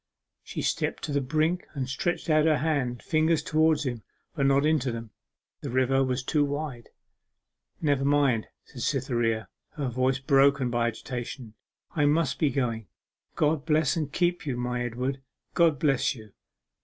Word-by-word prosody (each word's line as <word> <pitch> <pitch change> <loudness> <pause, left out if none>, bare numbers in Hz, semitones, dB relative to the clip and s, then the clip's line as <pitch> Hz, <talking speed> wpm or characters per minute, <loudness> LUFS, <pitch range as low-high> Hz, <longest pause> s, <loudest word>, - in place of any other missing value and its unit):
She - - -6
stepped - - -1
to - - -3
the 140 0 +1
brink 155 +6 0
and 135 -2 -2
stretched 175 +8 -2
out 155 -1 +4
her 155 -2 +4
hand 145 -5 0
and 120 0 -9
fingers 160 -1 +2
towards 155 -1 +2
his, 125 -4 -3 0.3
but 140 -4 +1
not 140 +1 +3
into 150 -5 +2
them. 115 -1 -7 0.5
The 140 - -5
river 130 +2 +2
was 130 0 -1
too 150 +3 +2
wide. 145 -4 -4 0.9
'Never 145 -4 +1
mind,' 140 -5 +2 0.2
said 125 - -10
Cytherea, 120 -6 0 0.3
her 145 -5 -2
voice 130 +2 +1
broken 135 -1 +3
by 120 -1 +1
agitation, 120 0 -6 0.4
'I 150 -3 +3
must 155 0 +1
be 150 - +3
going. 115 -5 -2 0.5
God 150 -1 +1
bless 155 -2 +2
and 155 -4 -2
keep 175 +1 0
you, 135 -5 -3
my 125 0 -2
Edward! 125 +3 -3 0.3
God 165 -4 +4
bless 135 -1 +1
you! 110 -3 -13
135 Hz, 165 wpm, -27 LUFS, 125-155 Hz, 0.9 s, out